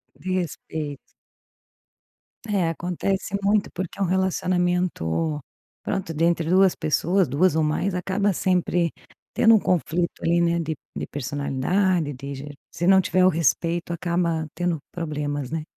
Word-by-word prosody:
De 185 0 -4
respeito. 160 -4 -3 1.5
É, 195 -5 +1
acontece 180 +4 -2
muito 205 +1 +2
porque 185 +2 -5
é - - -3
um - - +3
relacionamento, 180 - 0 0.4
pronto, 185 -4 -2
dentre 165 +1 +1
2 190 0 +5
pessoas. 170 +3 +1
2 155 +6 +2
ou 160 - +2
mais 155 +6 0
acaba 195 +3 0
sempre 175 -2 +1 0.4
tendo 225 0 +5
um - - +5
conflito, 175 -2 0
ali, 170 +1 +3
né, 170 0 +2
de 160 -1 -2 0.2
de - - -4
personalidade, 145 +5 0
de 140 +2 -7
je 145 +2 -8 0.2
se 175 - -1
não 190 0 +7
tiver 185 0 +2
o - - +7
respeito, 170 +1 0
acaba 170 -2 -1
tendo 175 -2 -1
problemas, 145 -5 -3
né? 160 -1 -2
170 Hz, 140 wpm, -24 LUFS, 155-185 Hz, 1.5 s, não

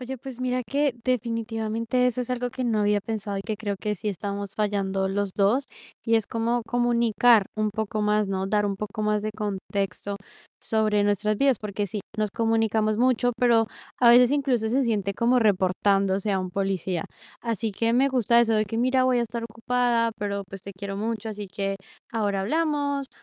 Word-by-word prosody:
Oye, 260 +1 -5
pues 255 0 -9
mira 255 0 0
que, 280 +2 +1
definitivamente, 230 0 -1
eso 250 0 0
es 245 - -7
algo 250 0 -1
que 255 +1 -4
no 225 -3 +1
había 205 -1 +2
pensado 205 -2 -4
y 195 - -3
que 215 +1 -3
creo 205 -2 -3
que 210 +2 -2
sí 210 - -4
estamos 200 0 -4
fallando 195 -2 0
los 195 0 -1
dos, 215 +7 +3 0.4
y 230 - +1
es 220 -2 +2
como 230 +2 -1
comunicar 235 -2 +3
un 215 0 +1
poco 215 +1 -3
más, 210 0 +2
¿no? 190 -1 -2
Dar 210 +1 +1
un 200 -1 -1
poco 210 +2 -5
más 210 0 +1
de 215 - -2
contexto 200 -1 -3 0.5
sobre 215 -2 +1
nuestras 205 +1 +1
vidas, 270 0 +3
porque 205 -1 -3
sí, 205 +2 -4 0.2
nos 215 -1 0
comunicamos 225 -1 +1
mucho, 245 0 +2
pero 235 -2 +4 0.3
a 240 - +6
veces 245 +1 +7
incluso 270 -6 +1
se 265 +4 +2
siente 210 -5 0
como 235 +5 +2
reportándose 195 -1 +2
a 190 - +1
un 185 -1 -4
policía. 190 -2 -2 0.4
Así 230 -1 -2
que 230 +3 0
me 260 +3 +4
gusta 235 -3 +3
eso 225 -1 +2
de 215 0 +2
que 225 +2 -4
mira, 255 +2 +3
voy 255 -1 +3
a - - +2
estar 235 0 -4
ocupada, 230 +1 +1
pero 200 -1 -2
pues 195 0 -8
te 200 - -8
quiero 195 +1 -6
mucho, 220 +1 -3
así 205 -2 -6
que 195 +1 -3 0.3
ahora 205 -4 0
hablamos. 285 +3 0
220 Hz, 195 wpm, -25 LUFS, 200-240 Hz, 0.5 s, veces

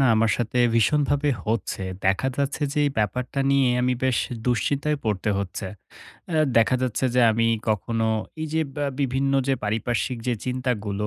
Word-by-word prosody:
না 135 - +5
আমার 110 0 +3
সাথে 120 +1 -2 0.2
ভীষণ 115 +7 +3
ভাবে 145 0 +1
হচ্ছে। 110 -3 -2 0.2
দেখা 95 +7 +2
যাচ্ছে 140 +1 -1
যে 150 - -2
এই - - +1
ব্যাপারটা 125 +6 -1
নিয়ে 140 -1 +4 0.2
আমি 125 0 +2
বেশ 130 -4 +2 0.3
দুশ্চিন্তায় 140 +5 +1
পড়তে 105 -1 0
হচ্ছে। 100 0 -4 0.6
অ্যা 160 -3 +1 0.2
দেখা 115 +3 +4
যাচ্ছে 130 0 -1
যে 125 - +4
আমি 115 +1 +1 0.2
কখনো 110 +2 0 0.4
এই - - -2
যে 160 - +2 0.2
বা 145 - -1
বিভিন্ন 135 +1 0 0.2
যে 135 - +3
পারিপার্শ্বিক 115 +3 -1
যে 120 - +2
চিন্তাগুলো 115 -5 -2
125 Hz, 170 wpm, -24 LUFS, 110-135 Hz, 0.6 s, না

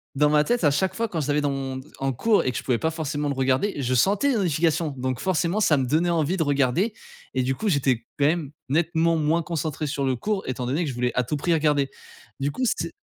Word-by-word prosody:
dans 150 +2 +4
ma 150 0 +4
tête, 240 -3 0
à 145 - +5
chaque 190 +6 0
fois, 230 +1 -1
quand 170 - -3
je 145 - -2
l'avais 150 0 +1
dans 145 - 0
mon 135 -1 -4 0.2
en 135 0 -1
cours 215 - +2
et 130 - +1
que 125 - -5
je - - -4
pouvais 125 -3 +1
pas 160 +7 -1
forcément 150 -2 -3
le 140 - 0
regarder, 135 +9 +1
je 130 0 0
sentais 195 - +3
les 265 - +2
notifications 165 -4 +1
donc 130 -1 -2
forcément, 180 +1 0
ça 165 -8 +4
me 135 -2 +1
donnait 160 +7 +1
envie 170 +1 +1
de 165 - +2
regarder 145 - +1 0.4
et 130 - +1
du 135 +1 0
coup, 215 - -3
j'étais 135 - +2 0.2
quand 140 - +2
même 155 -2 0 0.2
nettement 165 +2 +2
moins 160 +2 +1
concentré 155 -2 -3
sur 140 -1 -2
le 130 -1 +1
cours 200 - -2
étant 125 -1 -3
donné 140 +8 0
que - - -3
je 130 - -5
voulais 125 0 0
à 125 - +1
tout 125 +5 -3
prix 170 +4 0
regarder. 150 -3 +2 0.5
Du 140 +1 -1
coup, 255 - -4
c'est - - -4
150 Hz, 260 wpm, -24 LUFS, 135-170 Hz, 0.5 s, à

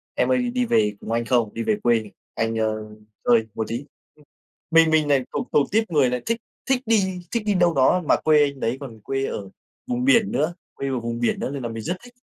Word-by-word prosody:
"Em - - +1
ơi, 250 -1 +1
đi 250 -1 +1
về 105 - +2
cùng - - -7
anh 115 0 0
không? 120 -3 +1
Đi 115 - -3
về 215 - +1
quê 115 -3 +1 0.2
anh, 115 0 -1
ơ, 110 -1 -2 0.4
chơi 115 -2 +4
một 110 - -2
tí." 120 +5 -4 0.3
Ừm, 150 - -22 0.5
mình 165 0 +6
mình 155 -2 +3
lại 135 -3 +3
thuộc - - -2
thuộc 145 - +2
tuýp 220 -3 +1
người 140 -5 +3
lại 125 0 -2
thích 230 0 -1 0.3
thích 260 -1 +2
đi 190 -5 +1
thích 235 -3 -1
đi 205 - +2
đâu 175 -2 +3
đó, 140 +7 +3
mà - - +4
quê 150 -1 +4
anh 140 -2 -2
đấy 115 +4 -1
còn 115 -5 -9
quê 135 +3 -2
ở 100 -2 -5 0.4
vùng 250 0 -1
biển 235 -7 +4
nữa 155 +5 0 0.2
quê 140 - -4
ở 130 -2 -1
vùng 115 0 -4
biển 120 - 0
nữa - - -2
nên 140 -3 -5
là 120 - -3
mình 115 -1 -6
rất 180 - -2
thích. 245 0 -14
140 Hz, 250 wpm, -23 LUFS, 115-190 Hz, 0.5 s, mình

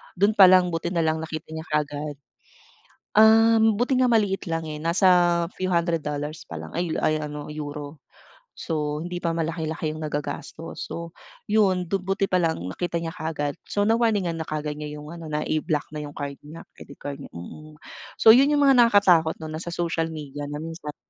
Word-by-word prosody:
dun 200 +4 +3
palang 185 -2 +7
buti 165 +1 -2
nalang 160 -1 +1
nakita 160 -1 -6
niya 160 0 -5
kaagad. 150 -1 -2 1.0
Um, 225 0 +6
buti 250 +2 +1
nga - - +5
maliit 205 -4 +1
lang, 165 0 -2
eh. 150 - -5
Nasa 170 +4 +1 0.5
few 185 0 -1
hundred 170 -2 +1
dollars 150 +1 -4
pa 85 - -6
lang 80 - -10
ay 170 -1 -2
ay 155 0 +1
ano, 150 0 -6
euro. 145 0 -7 0.5
So, 150 -1 -3
hindi 175 0 -5
pa 170 -1 -1
malaki-laki 160 -1 -2
yung 155 - -7
nagagastos. 155 +3 -5
So, 170 0 -6 0.4
'yon, 190 -5 +2
do'n 195 - +1
buti 195 0 0
pa 185 - +3
lang 165 -2 +1
nakita 170 - -4
niya 165 - -3
kaagad. 155 -2 -4
So, 205 - 0
na-warningan 210 -6 +1
na 160 - -5
kaagad 150 -1 -4
niya 150 0 -6
'yong 150 +2 -9
ano, 170 -1 -9
na 150 0 -2
iblock 155 -1 -1
na 150 - -5
'yong 145 - -10
card 140 -1 -5
niya, 155 +3 -11
credit 140 - -13
card 140 -1 -5
niya, 140 - -9
mm. 155 - -10 0.4
So, 220 - +7
'yon 265 +4 +6
'yong 290 -1 +3
mga 270 -3 +6
nakakatakot 195 -8 +5
'no, 155 - -6
na 155 - -5
sa 170 0 -6
social 165 -2 -1
media 145 -2 -7
na 150 +1 -5
minsan 160 -2 -7
160 Hz, 190 wpm, -24 LUFS, 150-185 Hz, 1.0 s, palang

